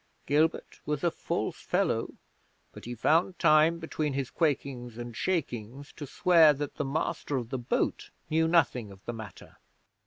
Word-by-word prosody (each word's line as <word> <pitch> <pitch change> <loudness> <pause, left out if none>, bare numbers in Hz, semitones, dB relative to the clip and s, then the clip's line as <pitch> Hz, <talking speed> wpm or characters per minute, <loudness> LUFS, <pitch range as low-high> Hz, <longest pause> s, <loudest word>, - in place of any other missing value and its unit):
Gilbert 155 +3 +1
was 150 -1 -3
a 170 - +3
false - - -3
fellow, - - 0 0.6
but - - -12
he 120 +1 -5
found 165 - +2
time 155 +1 +5
between 155 -3 -3
his 135 -2 -3
quakings 130 -6 -1
and 120 -1 -7
shakings 135 - -3
to 145 - -8
swear 165 +1 +5
that 145 0 -5
the - - 0
master 145 0 -2
of 120 -3 -4
the 130 - -2
boat 120 - -1 0.2
knew 160 +1 +2
nothing 140 - +2
of 95 0 -16
the 120 - -4
matter. 110 -5 -11
145 Hz, 160 wpm, -29 LUFS, 120-160 Hz, 0.6 s, time